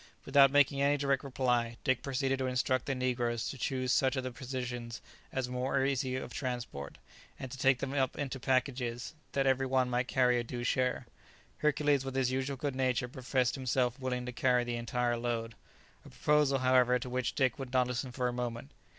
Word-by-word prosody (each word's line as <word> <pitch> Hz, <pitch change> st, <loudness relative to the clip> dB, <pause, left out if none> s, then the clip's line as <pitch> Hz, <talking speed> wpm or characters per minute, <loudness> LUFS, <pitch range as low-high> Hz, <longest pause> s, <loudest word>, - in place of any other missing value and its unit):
Without 135 Hz, 0 st, +6 dB
making 140 Hz, 0 st, +3 dB
any 145 Hz, +1 st, +3 dB
direct 140 Hz, -1 st, 0 dB
reply, 125 Hz, -3 st, 0 dB
Dick 130 Hz, -2 st, +1 dB
proceeded 135 Hz, 0 st, -1 dB
to 130 Hz, -, 0 dB
instruct 130 Hz, 0 st, 0 dB
the 135 Hz, -, 0 dB
negroes 120 Hz, -2 st, -1 dB
to -, -, -5 dB
choose 130 Hz, 0 st, -1 dB
such 130 Hz, +1 st, +2 dB
of 130 Hz, -, -2 dB
the 130 Hz, -, -4 dB
provisions 125 Hz, -2 st, -5 dB, 0.3 s
as 130 Hz, -2 st, -2 dB
were 125 Hz, +2 st, -1 dB
most 135 Hz, -, +2 dB
easy 130 Hz, -1 st, -1 dB
of 130 Hz, -, -5 dB
transport, 120 Hz, -, -5 dB, 0.4 s
and 130 Hz, -, -7 dB
to 130 Hz, 0 st, -2 dB
make 135 Hz, -1 st, +6 dB
them 135 Hz, +2 st, -4 dB
up 135 Hz, -2 st, 0 dB
into 135 Hz, -2 st, -3 dB
packages, 125 Hz, -1 st, -1 dB, 0.2 s
that 135 Hz, -1 st, +1 dB
every 135 Hz, 0 st, +2 dB
one 130 Hz, -1 st, +1 dB
might 125 Hz, +1 st, 0 dB
carry 125 Hz, -2 st, +3 dB
a -, -, -2 dB
due 120 Hz, +1 st, -5 dB
share. 125 Hz, 0 st, 0 dB, 0.5 s
Hercules 145 Hz, -2 st, +2 dB
with 135 Hz, -1 st, -5 dB
his 130 Hz, -1 st, +1 dB
usual 135 Hz, +1 st, -2 dB
good 140 Hz, 0 st, -3 dB
nature 130 Hz, -1 st, +1 dB
professed 130 Hz, 0 st, 0 dB
himself 130 Hz, -1 st, 0 dB
willing 125 Hz, -1 st, -2 dB
to 125 Hz, -, -4 dB
carry 125 Hz, 0 st, +2 dB
the 120 Hz, 0 st, -3 dB
entire 120 Hz, 0 st, -1 dB
load; 115 Hz, -1 st, -2 dB, 0.5 s
a -, -, -13 dB
proposal, 150 Hz, -2 st, +2 dB
however, 125 Hz, -1 st, +4 dB
to 125 Hz, -, -6 dB
which 125 Hz, -1 st, -2 dB
Dick 130 Hz, -1 st, +1 dB
would 135 Hz, -2 st, -6 dB
not 130 Hz, -1 st, +3 dB
listen 125 Hz, +1 st, -3 dB
for 125 Hz, 0 st, -1 dB
a 125 Hz, -, -2 dB
moment. 120 Hz, +2 st, -4 dB
130 Hz, 200 wpm, -32 LUFS, 125-135 Hz, 0.5 s, Without